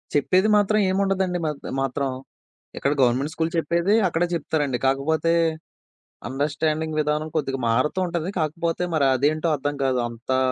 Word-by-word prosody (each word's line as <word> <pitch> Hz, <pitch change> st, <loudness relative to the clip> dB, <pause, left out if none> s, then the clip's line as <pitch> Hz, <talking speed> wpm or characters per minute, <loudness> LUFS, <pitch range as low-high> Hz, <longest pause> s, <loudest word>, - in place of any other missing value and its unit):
చెప్పేది 185 Hz, +8 st, +3 dB
మాత్రం 215 Hz, +1 st, +2 dB
ఏముండదండి 190 Hz, -2 st, 0 dB
మాత్ 150 Hz, -2 st, -4 dB, 0.2 s
మాత్రం. 135 Hz, +1 st, -1 dB, 0.7 s
ఇక్కడ 140 Hz, -, 0 dB
గవర్నమెంట్ 130 Hz, +5 st, +2 dB
స్కూల్ 160 Hz, 0 st, -1 dB
చెప్పేది 170 Hz, +4 st, +1 dB
అక్కడ 165 Hz, 0 st, 0 dB
చెప్తారండి. 145 Hz, -5 st, -1 dB
కాకపోతే 155 Hz, +5 st, +1 dB, 1.0 s
అండర్‌స్టాండింగ్ 155 Hz, +3 st, -1 dB
విధానం 150 Hz, +1 st, -1 dB
కొద్దిగా 135 Hz, -3 st, -1 dB
మారుతూ 130 Hz, +10 st, +1 dB
ఉంటంది. 170 Hz, 0 st, -3 dB
కాకపోతే 165 Hz, +3 st, -1 dB
మరదేంటో 145 Hz, +3 st, +2 dB
అర్థం 145 Hz, +1 st, -3 dB
కాదు. 130 Hz, -1 st, +1 dB
అంతా, 120 Hz, +3 st, -2 dB
155 Hz, 125 wpm, -23 LUFS, 135-170 Hz, 1.0 s, చెప్పేది